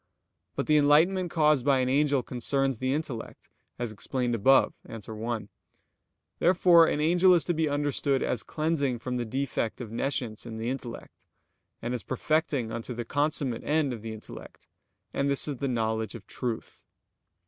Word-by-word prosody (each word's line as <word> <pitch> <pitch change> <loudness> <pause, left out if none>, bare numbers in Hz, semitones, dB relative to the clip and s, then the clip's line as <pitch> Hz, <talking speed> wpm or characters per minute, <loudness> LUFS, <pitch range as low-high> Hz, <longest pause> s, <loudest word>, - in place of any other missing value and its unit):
But - - -1
the 150 - +4
enlightenment 165 +6 +4
caused 150 -5 +3
by 140 0 +3
an 130 -1 +1
angel 140 0 +2
concerns 135 +1 -1
the 130 0 0
intellect, 135 -6 -5 0.3
as 120 -2 -3
explained 120 +3 -2
above 130 +5 +4
(A. 115 - -7
1); 110 0 -5 0.9
therefore 170 -1 +6
an - - 0
angel 175 +4 +5
is 170 - +3
to 175 - 0
be 160 -1 0
understood 145 -1 0
as 120 - -1
cleansing 155 -5 -1
from 125 +2 -4
the 120 - -2
defect 130 -2 -2
of 115 -4 -7
nescience 115 -2 -2
in 110 -1 -6
the 115 +3 -2
intellect; 125 -3 -8 0.6
and 120 +2 -2
as 125 - -3
perfecting 135 -3 -1
unto 115 +2 -5
the 120 0 -4
consummate 145 -3 0
end 150 -3 +1
of 115 - -7
the 115 0 -6
intellect, 110 -1 -11 0.5
and 140 0 0
this 140 +1 +2
is 145 -3 -3
the 140 - -2
knowledge 110 -2 -1
of 110 -4 -10
truth. 120 0 -5
130 Hz, 170 wpm, -28 LUFS, 115-150 Hz, 0.9 s, therefore